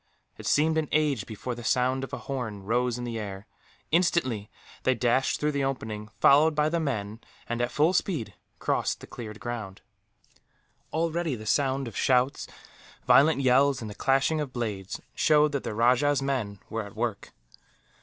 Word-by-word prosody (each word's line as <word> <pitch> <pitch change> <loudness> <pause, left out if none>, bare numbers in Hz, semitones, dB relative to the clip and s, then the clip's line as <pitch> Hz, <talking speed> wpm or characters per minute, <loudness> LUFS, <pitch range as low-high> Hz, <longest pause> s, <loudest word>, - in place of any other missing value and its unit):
It - - -8
seemed 160 +2 +3
an 155 - -3
age 145 -8 +1
before 115 +3 -5
the 120 0 -8
sound 130 +2 +1
of 135 - -6
a 140 - -3
horn 120 -7 -4
rose 120 +3 0
in 125 - -5
the 115 -2 -4
air. 100 -1 -6 0.5
Instantly 150 - +1 0.3
they 130 - +2
dashed 125 +2 +1
through 150 0 +1
the 140 -1 -1
opening, 110 -6 -4
followed 150 +3 +5
by 150 0 +2
the 170 +1 0
men 110 -8 -3 0.3
and, 120 0 -2
at 120 - +1
full 155 +5 +2
speed, 175 - -1 0.2
crossed - - -1
the - - -8
cleared 110 -3 -8
ground. 110 -6 -6 1.1
Already 165 -2 -1
the 110 -2 -9
sound 135 +2 +1
of 115 - -9
shouts, 130 +1 +2 0.6
violent 140 +4 +5
yells, 135 +1 +4
and 110 -2 -6
the - - -7
clashing 135 +7 +1
of 145 -3 -4
blades 105 -6 -4
showed 150 -1 +4
that 140 -2 -1
the 105 - -4
rajah's 125 +5 +3
men 130 -7 -2
were 115 0 -3
at 100 - -11
work. - - -3
130 Hz, 175 wpm, -27 LUFS, 115-145 Hz, 1.1 s, followed